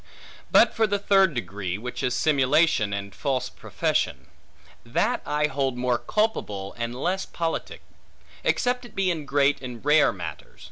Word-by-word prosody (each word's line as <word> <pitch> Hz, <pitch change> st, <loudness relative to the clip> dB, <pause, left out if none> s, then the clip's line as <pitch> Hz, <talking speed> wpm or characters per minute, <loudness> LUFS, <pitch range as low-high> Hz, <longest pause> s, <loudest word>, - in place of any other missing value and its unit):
But -, -, +5 dB
for 225 Hz, -1 st, +2 dB
the 205 Hz, 0 st, 0 dB
third 195 Hz, -5 st, +3 dB
degree, 95 Hz, -4 st, -3 dB
which 125 Hz, +4 st, -6 dB
is 125 Hz, -1 st, 0 dB
simulation, 140 Hz, -6 st, +3 dB
and 100 Hz, -1 st, -4 dB
false 130 Hz, +3 st, -2 dB
profession; -, -, -2 dB, 0.6 s
that -, -, 0 dB
I 150 Hz, 0 st, +1 dB
hold 135 Hz, -3 st, -1 dB
more 125 Hz, -1 st, +1 dB
culpable, 120 Hz, -, -1 dB
and 120 Hz, 0 st, -4 dB
less 185 Hz, +9 st, -2 dB
politic; 165 Hz, -1 st, -4 dB, 0.6 s
except 245 Hz, 0 st, +1 dB
it 240 Hz, -, -13 dB
be 195 Hz, -2 st, +1 dB
in 155 Hz, -4 st, -4 dB
great 140 Hz, 0 st, +2 dB
and 125 Hz, -1 st, -8 dB
rare 150 Hz, +1 st, +5 dB
matters. 85 Hz, -6 st, -8 dB
135 Hz, 150 wpm, -25 LUFS, 120-170 Hz, 0.6 s, But